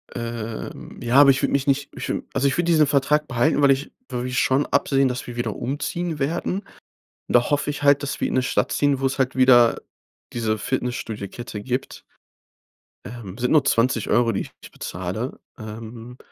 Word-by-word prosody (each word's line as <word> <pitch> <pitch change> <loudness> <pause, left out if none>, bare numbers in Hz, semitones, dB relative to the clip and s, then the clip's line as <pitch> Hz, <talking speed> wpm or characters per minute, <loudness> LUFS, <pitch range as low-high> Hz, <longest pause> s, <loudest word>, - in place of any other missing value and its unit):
Ähm, 115 -2 -6
ja, 120 0 -1
aber 140 0 +8
ich 135 0 +4
würd - - +1
mich 140 0 0
nicht 140 0 +1
ich - - -4 0.2
also, 135 +1 +2
ich 135 - 0
würde 175 - +1
diesen 155 -3 +5
Vertrag 145 +2 +2
behalten, 135 +5 +1
weil 140 -1 +6
ich 135 +1 -1 0.2
wir 125 +1 -3
schon 130 +3 +2
absehen, 135 -1 +2
dass 125 -1 -3
wir 120 - -7
wieder 120 -3 -2
umziehen 155 +4 -3
werden. 165 +6 -1 0.7
Und - - -4
da 120 +3 +4
hoffe 145 0 +1
ich 145 - -5
halt, 140 0 +4
dass 140 - -4
wir - - +1
in - - -3
'ne 130 - +3
Stadt 125 - 0
ziehen, 145 -2 +1
wo's 135 0 -1
halt 130 -1 0
wieder 125 -3 +5 0.5
diese 110 -2 -1
Fitnessstudiokette 120 -3 -4
gibt. 125 +3 -4 1.0
Ähm, 110 -4 -8
sind 125 0 -1
nur 155 -4 +5
20€, 115 -1 +2
die - - -1 0.2
ich - - -12
bezahle. 95 +8 -5 0.2
Ähm, 115 +2 -9
130 Hz, 180 wpm, -23 LUFS, 120-140 Hz, 1.0 s, aber